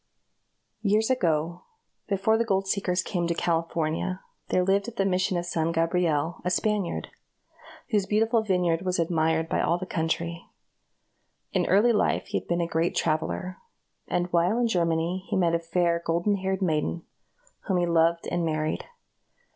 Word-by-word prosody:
A - - -49
CALIFORNIA - - -49
STORY. 210 -2 -1
Years 220 +2 +3
ago, 170 -7 0 0.5
before 200 +2 +2
the 230 - +2
gold 195 -3 0
seekers 185 -2 0
came 175 -4 -1
to 170 - 0
California, 165 +2 -1 0.3
there 180 - +2
lived 195 +3 +1
at 235 - -7
the 195 - +1
Mission 185 -1 +1
of 175 - -2
San 165 -1 0
Gabriel, 165 -1 0
a 180 - 0
Spaniard, 205 0 -1 0.8
whose 205 -3 +1
beautiful 225 +2 +2
vineyard 180 -5 +1
was 185 -1 -1
admired 160 -1 +1
by - - 0
all 170 - +2
the 185 - -5
country. 170 0 -2 1.1
In - - +1
early 210 +6 +4
life 210 - +1
he - - -1
had - - -20
been 175 0 0
a - - +1
great 165 +1 0
traveler, 160 +3 -1 0.5
and 175 - 0
while 175 +6 +3
in 240 -1 +2
Germany, 170 -1 0
he - - 0
met 170 -3 +2
a 170 - +2
fair 170 0 0
golden 170 +5 +1
haired 190 0 -2
maiden, 160 0 0 0.6
whom 190 -3 +1
he 175 - +2
loved 170 0 +2
and 175 -1 0
married. 155 -1 -1
175 Hz, 170 wpm, -26 LUFS, 165-195 Hz, 1.1 s, early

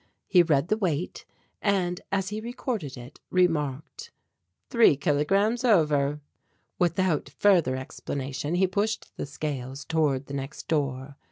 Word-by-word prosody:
He 180 - +5
read 155 -2 +2
the 215 - +2
weight 175 -4 -2 0.4
and 185 -4 0
as 195 -1 0
he 210 +1 -4
recorded 225 - -4
it, 125 +3 -11
remarked: 165 - 0 0.6
"Three 230 - +5
kilograms 195 - +1
over." 150 - +3 0.6
Without 175 -2 +1
further 175 -11 +3
explanation 135 +3 -4
he 190 +2 +4
pushed 205 +4 -2
the - - -4
scales 140 -2 -5
toward 150 -5 +1
the 140 - -9
next 140 +1 -6
door. 140 -2 -2
160 Hz, 125 wpm, -27 LUFS, 140-195 Hz, 0.6 s, He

